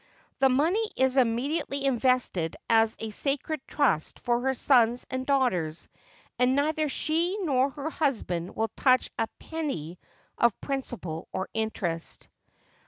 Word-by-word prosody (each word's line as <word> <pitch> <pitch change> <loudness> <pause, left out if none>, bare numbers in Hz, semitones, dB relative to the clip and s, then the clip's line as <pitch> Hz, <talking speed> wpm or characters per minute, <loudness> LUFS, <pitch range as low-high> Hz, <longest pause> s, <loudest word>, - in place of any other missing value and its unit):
The 270 - +5
money 340 - +2
is 260 0 +2
immediately 275 +3 0
invested 250 -10 +1
as 225 -1 +3
a 220 -1 -4
sacred 280 +5 -2
trust 255 - +1
for 240 -1 0
her 265 +1 0
sons 245 -2 +3
and 260 0 -3
daughters, 185 - 0 0.5
and 250 +1 +3
neither 305 +1 +1
she 335 +7 0
nor 270 -4 +2
her 290 +3 -5
husband 210 - -1
will 225 0 0
touch 255 -2 +3
a 225 - +1
penny 190 - -5 0.4
of 235 -3 +3
principal 240 - -4
or 190 - -3
interest. 200 -7 -3
255 Hz, 130 wpm, -27 LUFS, 225-285 Hz, 0.5 s, The